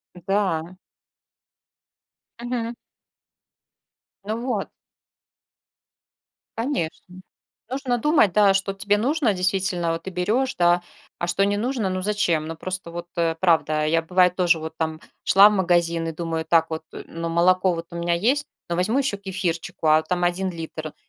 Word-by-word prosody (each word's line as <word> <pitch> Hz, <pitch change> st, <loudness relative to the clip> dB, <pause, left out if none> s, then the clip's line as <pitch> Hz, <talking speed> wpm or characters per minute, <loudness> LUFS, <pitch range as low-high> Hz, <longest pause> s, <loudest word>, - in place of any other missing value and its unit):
Да. 180 Hz, -2 st, -1 dB, 1.7 s
Мгм. 240 Hz, -1 st, -3 dB, 1.5 s
Ну 215 Hz, +2 st, -2 dB
вот. 255 Hz, -, -1 dB, 1.9 s
Конечно. 185 Hz, -, -3 dB, 0.5 s
Нужно 260 Hz, -2 st, -1 dB
думать, 295 Hz, -, +3 dB
да, 200 Hz, +1 st, +5 dB
что 195 Hz, +1 st, 0 dB
тебе 200 Hz, +1 st, +1 dB
нужно 270 Hz, +1 st, +1 dB
действительно, 180 Hz, -2 st, 0 dB
вот 165 Hz, -, -4 dB
ты 190 Hz, -, -5 dB
берешь, 220 Hz, +9 st, 0 dB
да, 175 Hz, 0 st, +3 dB, 0.4 s
а 175 Hz, -, -1 dB
что 195 Hz, +3 st, +2 dB
не 205 Hz, 0 st, +1 dB
нужно, 235 Hz, -1 st, -1 dB
ну, 185 Hz, 0 st, -2 dB
зачем? 185 Hz, -6 st, 0 dB
Ну, 165 Hz, -, -5 dB
просто 185 Hz, +1 st, -5 dB
вот, 175 Hz, 0 st, -6 dB
э, 165 Hz, -1 st, +1 dB
правда, 155 Hz, -4 st, +2 dB
я, 165 Hz, +1 st, +2 dB
бывает, 180 Hz, +1 st, +3 dB
тоже 180 Hz, -2 st, +3 dB
вот 160 Hz, 0 st, -6 dB
там 160 Hz, -1 st, -3 dB, 0.2 s
шла 200 Hz, +2 st, +7 dB
в -, -, -1 dB
магазин 170 Hz, -3 st, +1 dB
и -, -, -3 dB
думаю 165 Hz, 0 st, -3 dB
так 165 Hz, 0 st, +3 dB
вот: 160 Hz, 0 st, -4 dB
"Э, -, -, -8 dB
ну, 165 Hz, 0 st, -5 dB
молоко 180 Hz, +2 st, +3 dB
вот 165 Hz, 0 st, -6 dB
у -, -, -6 dB
меня 170 Hz, 0 st, 0 dB
есть, 250 Hz, +11 st, +1 dB, 0.2 s
но 170 Hz, -, -1 dB
возьму 205 Hz, +9 st, +1 dB
еще 270 Hz, -7 st, 0 dB
кефирчику". 180 Hz, -5 st, -3 dB
А 155 Hz, +1 st, +5 dB
там 175 Hz, +2 st, -1 dB
1 185 Hz, +2 st, 0 dB
литр, 160 Hz, -2 st, -7 dB
180 Hz, 155 wpm, -23 LUFS, 165-205 Hz, 1.9 s, шла